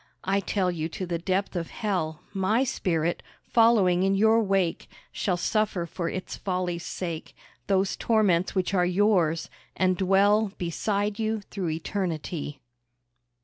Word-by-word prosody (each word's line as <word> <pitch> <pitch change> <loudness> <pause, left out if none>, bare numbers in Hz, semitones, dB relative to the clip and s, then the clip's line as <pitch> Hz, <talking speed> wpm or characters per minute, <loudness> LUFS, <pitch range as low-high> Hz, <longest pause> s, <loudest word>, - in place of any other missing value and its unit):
I 195 +1 +1
tell 190 -1 0
you 160 -2 -3
to 185 - -3
the 170 -1 -2
depth 190 +3 -1
of 170 -2 -3
Hell, 180 -8 -2
My 205 +6 +2
spirit, 170 -9 -1 0.2
following 215 -6 +4
in 195 +1 +2
your 220 +3 +4
wake, 195 -5 0 0.2
Shall 180 -3 -1
suffer 205 -2 0
for 170 0 -3
its 185 - -5
folly's 180 -3 -2
sake 170 -3 -5 0.3
Those 195 -1 +2
torments 200 -6 +2
which 185 +1 0
are 180 -2 +3
yours, 180 -3 +2 0.3
and 185 -1 +3
dwell 200 +2 +3
Beside 200 +5 -1
you 220 -1 -1
through 190 -5 -2
Eternity. 160 -4 -3
185 Hz, 140 wpm, -26 LUFS, 175-205 Hz, 0.3 s, following